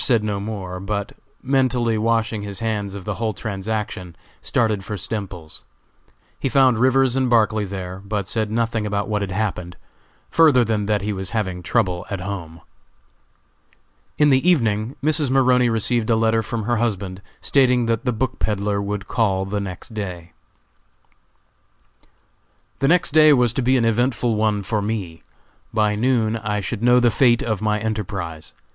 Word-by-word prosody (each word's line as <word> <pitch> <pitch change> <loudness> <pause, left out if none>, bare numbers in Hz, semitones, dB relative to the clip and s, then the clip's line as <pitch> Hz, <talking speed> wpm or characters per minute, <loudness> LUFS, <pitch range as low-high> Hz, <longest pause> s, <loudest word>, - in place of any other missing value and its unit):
said 120 -6 +2
no 105 -2 -2
more, 100 -3 -5
but 100 +1 -3 0.3
mentally 130 -3 +1
washing 115 0 0
his 100 -1 -6
hands 105 -2 -3
of 95 -2 -8
the 105 - -2
whole 110 -1 0
transaction, 100 -4 -4 0.3
started 110 -4 0
for 105 +1 -5
Stemples's. 95 -7 -5 0.8
He 135 - -1
found 130 -4 +4
Rivers 130 0 +3
and 130 -1 +1
Barclay 110 -2 +2
there, 95 -1 -6
but 100 -2 -3
said 110 -2 0
nothing 115 -1 -1
about 100 0 -2
what 105 -1 -1
had 100 - -3
happened, 90 -4 -3 0.5
further 150 -7 +5
than 105 -3 -1
that 105 -2 0
he 105 +1 -1
was 95 -1 -5
having 95 -4 -2
trouble 90 -3 0
at 100 - -3
home. 90 -4 -6 1.6
In 150 -1 +4
the 135 +7 +3
evening 115 -6 +1
Mrs. 150 -2 +1
Maroney 125 -2 +3
received 115 0 0
a 115 - +4
letter 115 0 +2
from 115 0 -4
her 120 +2 0
husband, 100 -5 -2 0.2
stating 125 -3 +3
that 115 0 0
the 125 - 0
book 130 +3 -3
peddler 100 -1 -1
would 100 0 -4
call 95 -5 0
the 100 +1 -2
next 95 +3 -7
day. 90 -5 -6 2.5
The 135 - +2
next 175 +1 +3
day 155 0 +7
was 125 -4 +3
to - - -1
be 130 +2 +3
an 120 - +1
eventful 120 +1 +1
one 105 -1 0
for 105 +1 -1
me. 100 -6 -4 0.5
By 105 -1 +1
noon 115 -1 +1
I 105 -1 -2
should 105 +2 -4
know 125 +1 +5
the 120 -1 +3
fate 120 +4 +3
of 110 -4 -2
my 105 0 +1
enterprise. 100 -7 -4
110 Hz, 165 wpm, -21 LUFS, 100-120 Hz, 2.5 s, day